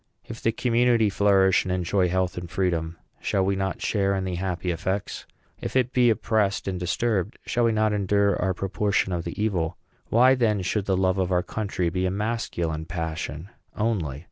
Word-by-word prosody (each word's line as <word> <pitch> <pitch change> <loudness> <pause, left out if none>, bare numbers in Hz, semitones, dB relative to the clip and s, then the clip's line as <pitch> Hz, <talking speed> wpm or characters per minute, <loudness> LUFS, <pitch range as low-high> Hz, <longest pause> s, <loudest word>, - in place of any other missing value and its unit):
If 115 - -9
the 115 - +2
community 115 -2 +2
flourish 95 -1 +4
and 95 - -3
enjoy 90 +1 +1
health 95 0 0
and 90 -1 -6
freedom, 85 -3 -1 0.2
shall 95 -1 +1
we 100 0 +1
not 95 0 -3
share 100 -2 +1
in 95 - -1
the 95 -1 -3
happy 90 0 -2
effects? 95 +4 -3 0.3
If - - -5
it 130 -1 +2
be 125 -1 +4
oppressed 110 -3 0
and 95 -2 -2
disturbed, 100 +3 -1
shall 120 0 +1
we 115 - +3
not 110 -1 +1
endure 100 -1 +2
our 95 0 0
proportion 95 0 0
of 85 -1 -3
the 85 - -6
evil? 90 -6 -1 0.3
Why, 125 +3 +6
then, 110 -6 +1
should 100 +1 -1
the 95 -2 +1
love 95 0 +1
of 95 0 0
our 90 -1 +2
country 95 -5 -2
be 90 +2 -1
a - - +1
masculine 90 -6 -2
passion 80 0 -4 0.3
only? 95 - -1
95 Hz, 190 wpm, -25 LUFS, 90-105 Hz, 0.3 s, Why